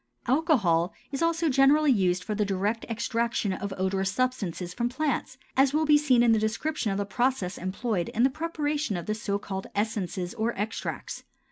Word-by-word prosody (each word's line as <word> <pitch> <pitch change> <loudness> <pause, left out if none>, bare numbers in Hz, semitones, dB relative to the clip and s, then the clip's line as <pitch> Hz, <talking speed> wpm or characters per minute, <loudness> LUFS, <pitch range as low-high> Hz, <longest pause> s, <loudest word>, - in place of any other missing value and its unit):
Alcohol 235 - +2 0.2
is 275 - -3
also 335 0 +2
generally 280 +2 +5
used 185 -5 +2
for 215 - -3
the 210 0 +1
direct 200 +3 -1
extraction 230 -2 -1
of 200 +1 -4
odorous 190 0 0
substances 195 -7 -2
from 240 +3 -1
plants, 270 -1 -2 0.2
as 270 +2 +4
will 315 +1 +2
be 300 -1 +6
seen 270 -5 +4
in 235 - +5
the 220 - +4
description 220 +3 -1
of 195 - -1
the 200 - -1
processes 240 -4 -1
employed 185 0 -2
in 230 - +1
the 265 - +5
preparation 300 - -2
of 175 - -5
the 215 - -1
so 205 -2 -2
called 190 -1 -5
essences 200 -3 -2
or 235 0 -1
extracts. 210 +3 -4
225 Hz, 180 wpm, -27 LUFS, 195-270 Hz, 0.2 s, be